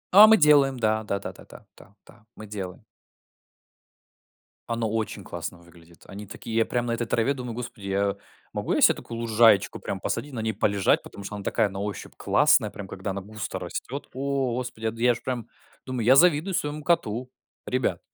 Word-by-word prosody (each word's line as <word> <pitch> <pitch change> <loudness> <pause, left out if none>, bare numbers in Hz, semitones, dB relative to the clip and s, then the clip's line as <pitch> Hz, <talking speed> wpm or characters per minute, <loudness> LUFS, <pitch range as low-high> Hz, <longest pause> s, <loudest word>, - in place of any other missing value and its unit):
А 210 +2 +11
мы 220 0 +7
делаем, 145 -5 +5
да. 110 -1 +1
Да 100 -2 -2
да - - -6
да - - -15
да. - - -15 0.2
Да, 110 -1 -20
мы 110 - -9
делаем. 100 -3 -7 1.9
Оно 115 -2 -1
очень 110 0 -3
классно 90 - -6
выглядит. 85 -1 -19
Они 100 +2 -8
такие 110 +3 -7
я 115 0 +3
прям 120 -1 -1
на 115 - -1
этой 120 0 -2
траве 115 +4 +1
думаю: 125 -3 -6
господи, 115 -4 -7
я 100 +1 0 0.4
могу - - -1
я - - +1
се - - +7
такую 115 -1 -8
лужаечку 110 -3 +4
прям 95 - -4
посадить, 145 +8 -3
на 115 - -3
ней 110 0 -1
полежать, 100 -2 +2
потому 100 - -10
что 105 - -6
она 100 - -7
такая 110 0 +1
на 95 0 -7
ощупь 100 0 -5
классная, - - +3
прям 100 - -9
когда 95 +1 -5
она 100 +1 -4
густо 105 +1 -6
растет. 140 +3 -6
О, 135 -2 -1
господи, 120 -3 -5
я 110 - +1
д 115 0 -10
я 125 -1 +5
ж - - -10
прям 125 -4 -4 0.4
думаю, 125 -3 -3
я 130 +3 +7
завидую 170 +4 +4
своему 150 -2 -2
коту, 125 -7 0 0.4
ребят. 130 -1 0
115 Hz, 200 wpm, -26 LUFS, 100-130 Hz, 1.9 s, А